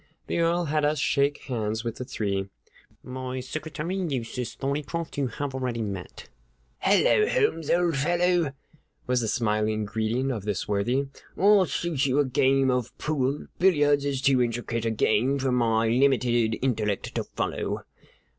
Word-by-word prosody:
The - - -2
Earl 170 +1 +2
had 150 0 0
us 150 +1 +2
shake 140 +1 +1
hands 110 -3 -2
with 115 -1 -4
the - - -4
three. 100 -5 -2 0.5
"My 130 0 -5
secretary, 155 +6 -4
Eustace 125 -8 -3
Thorneycroft, 150 +4 -3
you 135 - +1
have 135 +4 -4
already 125 -3 -2
met." 95 -4 -7 0.5
"Hello, 205 - +4
Holmes, 425 - +1
old 170 -3 +2
fellow," 175 +1 +2 0.5
was 125 -1 +1
the 115 - -1
smiling 110 -2 0
greeting 110 +5 -1
of 110 -6 -4
this 100 -2 -2
worthy. 115 +7 0 0.3
"I'll 200 0 +5
shoot 160 -6 -1
you 130 +1 +1
a 145 - +4
game 135 +1 +3
of 125 -2 -2
pool. 140 -2 -1
Billiards 145 -6 +4
is 140 -2 -2
too 135 -3 +4
intricate 115 -1 -2
a - - +2
game 115 +4 +2
for 135 -1 0
my 115 -2 +2
limited 120 -2 +2
intellect 105 -6 -1
to - - -1
follow." - - -3
130 Hz, 155 wpm, -26 LUFS, 115-150 Hz, 0.5 s, I'll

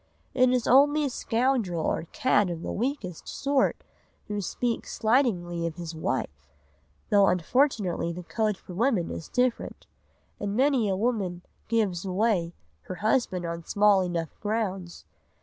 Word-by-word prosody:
It 255 -1 +4
is 250 -2 +1
only 290 +4 +5
a 275 - -2
scoundrel 230 -9 0
or 165 - -1
cad 260 -10 +2
of 170 -1 -5
the - - -3
weakest 220 - -3
sort 275 -1 0 0.4
who 205 -1 -3
speaks 230 +5 -3
slightingly 185 -9 +1
of 160 - -6
his 170 -1 -6
wife, 75 - -3 0.6
though 200 -1 +6
unfortunately 185 - +1
the 180 +1 -7
code 215 +2 -1
for 180 - -11
women 215 -3 +1
is 160 - -7
different, 250 -1 -1 0.5
and 205 0 -3
many 260 -4 +3
a 190 - +1
woman 195 -6 -1 0.2
"gives 210 -6 0
away" 190 -3 0 0.3
her 185 - -6
husband 215 -4 0
on 170 0 -4
small 205 +1 +4
enough 170 -3 -3
grounds. 195 -5 -3
205 Hz, 145 wpm, -27 LUFS, 175-245 Hz, 0.6 s, though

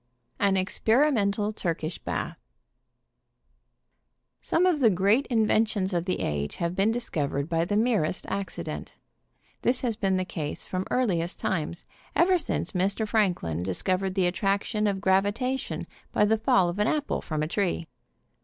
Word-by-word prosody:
AN 200 -1 +3
EXPERIMENTAL 210 0 +2
TURKISH 165 -4 -3
BATH. - - -3 2.1
Some 350 - +2
of 355 -5 +3
the 240 -5 +6
great 200 +7 +2
inventions 215 -4 +2
of 170 -1 0
the 185 - -1
age 75 -1 -2
have 170 +1 -2
been 195 +3 +3
discovered 150 - -2
by 165 0 +1
the 205 - -1
merest 215 -8 +1
accident. 195 0 -5 0.7
This 250 +1 +2
has 235 -4 0
been 195 -2 +1
the 185 - -1
case 150 -5 -4
from 185 0 -3
earliest 180 -9 0
times, 170 -1 -2 0.3
ever 365 +1 +4
since - - -2
Mr. 195 +3 0
Franklin 180 - +1
dis 90 0 -3
covered 190 0 0
the 190 -2 +2
attraction 200 +3 0
of 195 -1 -1
gravitation 205 +7 0 0.3
by 210 - +3
the 220 +1 +2
fall 190 -4 +3
of 175 +3 -3
an 210 - +3
apple 295 +1 0
from 155 -1 -2
a - - -1
tree. 175 -1 -1
195 Hz, 150 wpm, -27 LUFS, 175-220 Hz, 2.1 s, the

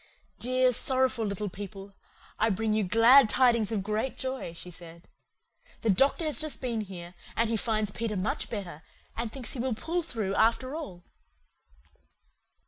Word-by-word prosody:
"Dear, 255 +1 +2
sorrowful 260 -2 +1
little 200 +1 -3
people, 195 +1 -8 0.5
I 225 - +3
bring 215 +2 0
you 215 0 +2
glad 230 +6 +6
tidings 235 -4 +3
of 205 -4 -1
great 215 +5 -2
joy," 260 -9 -4
she 180 +1 -10
said. 170 -1 -13 0.7
"The 225 - +3
doctor 275 - +3
has 305 +1 0
just 310 -1 -1
been 235 -3 -2
here, 180 -3 -8 0.2
and 230 0 +1
he - - +1
finds 215 -2 0
Peter 215 -1 -3
much 185 +3 -2
better, 180 -8 -6 0.3
and 230 -1 -3
thinks 250 -3 -3
he 260 - -5
will 250 -1 -1
pull 340 +9 -2
through 220 - -3
after 235 +5 +2
all." 190 - -7
225 Hz, 160 wpm, -29 LUFS, 195-255 Hz, 0.7 s, glad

